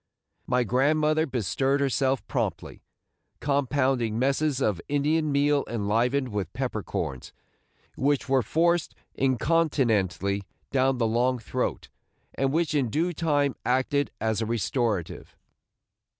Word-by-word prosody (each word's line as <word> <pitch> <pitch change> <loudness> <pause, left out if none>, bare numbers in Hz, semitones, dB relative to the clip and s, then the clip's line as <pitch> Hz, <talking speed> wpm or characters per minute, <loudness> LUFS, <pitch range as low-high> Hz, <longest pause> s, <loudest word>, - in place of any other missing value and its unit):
My 125 0 +2
grandmother 150 +6 +2
bestirred 135 +3 0
herself 135 -1 +1
promptly, - - -3 0.6
compounding 135 -5 0
messes 140 +2 +1
of 105 -9 0
Indian 150 +2 +1
meal 145 0 +2
enlivened 120 +5 0
with 100 -5 -3
pepper 125 -5 -2
corns, 65 -7 -4 0.6
which 140 0 0
were 135 -1 +3
forced 170 +5 +1 0.2
incontinently 120 - +1 0.3
down 135 -1 +2
the 120 - +1
long 120 +3 +1
throat, 115 - -3 0.5
and 135 0 0
which 165 +1 0
in 135 -5 +1
due 170 +9 0
time 145 -4 +1
acted 130 +3 +1
as 110 0 0
a 110 - -1
restorative. 115 - -2
135 Hz, 115 wpm, -26 LUFS, 115-145 Hz, 0.6 s, were